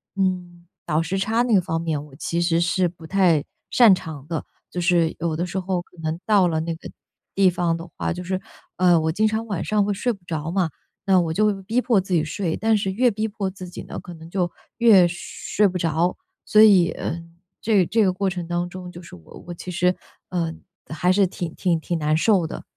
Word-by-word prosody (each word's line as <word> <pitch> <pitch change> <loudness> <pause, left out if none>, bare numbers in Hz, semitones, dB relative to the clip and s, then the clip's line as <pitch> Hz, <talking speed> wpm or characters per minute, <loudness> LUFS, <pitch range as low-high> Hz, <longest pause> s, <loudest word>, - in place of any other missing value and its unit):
嗯， 180 -2 -2 0.2
倒 155 +2 +2
时 190 +3 -2
差 225 +5 +1
那 240 -3 +1
个 190 - +5
方 165 -2 -2
面， 160 -3 -2
我 145 -3 -15
其 170 +3 -2
实 170 -1 +2
是 180 +1 +2
不 165 -1 -11
太 175 -5 +3 0.3
擅 230 -6 +7
长 155 -6 -5
的， 165 -2 -3 0.3
就 180 - -3
是 170 -2 +2
有 165 -1 -1
的 170 +3 -1
时 180 +2 -3
候 180 -1 -2
可 180 - -25
能 160 +1 -2
到 205 -4 +4
了 160 -2 0
那 165 0 -3
个 160 - -10 0.5
地 195 -1 +5
方 170 -1 0
的 165 +1 -9
话， - - -2
就 180 +1 -6
是， 185 +1 -2 0.4
呃， 175 -2 +5
我 160 0 0
经 215 +6 +2
常 220 +1 -1
晚 200 -5 -2
上 210 -1 +2
会 205 - 0
睡 245 +5 0
不 195 -4 -16
着 160 -1 -3
嘛， 180 -2 +1 0.4
那 190 -1 +5
我 165 -2 0
就 215 - +2
会 200 -2 -1
逼 230 +6 0
迫 235 -6 +3
自 190 0 -4
己 165 -3 +3
睡， 165 +1 -2
但 220 0 +2
是 195 -1 -1
越 245 +6 +3
逼 215 +1 -2
迫 200 -2 -3
自 185 -1 -9
己 175 - -8
呢， - - -7
可 175 - -10
能 165 0 -12
就 175 -1 -1 0.3
越 215 -7 +6
睡 180 +4 -1
不 185 - -5
着。 165 +2 +1 0.3
所 215 - +5
以， 195 -5 +7
呃， 170 - -4 0.4
这 220 -2 +1
个 180 - +4
这 220 +1 +3
个 185 - +2
过 195 +1 0
程 175 -2 -5
当 175 +1 -2
中， 180 0 -8
就 175 - -10
是 170 - -12
我 80 - -14
我 175 - -5
其 180 - -7
实， 180 +1 +2 0.3
呃， 170 -3 -1 0.4
还 180 +3 +2
是 195 +1 +4
挺 175 -2 -5
挺 175 -3 +1
挺 170 +2 -2
难 155 0 +1
受 185 +1 +3
的。 160 - -7
180 Hz, 255 characters per minute, -23 LUFS, 165-195 Hz, 0.5 s, 擅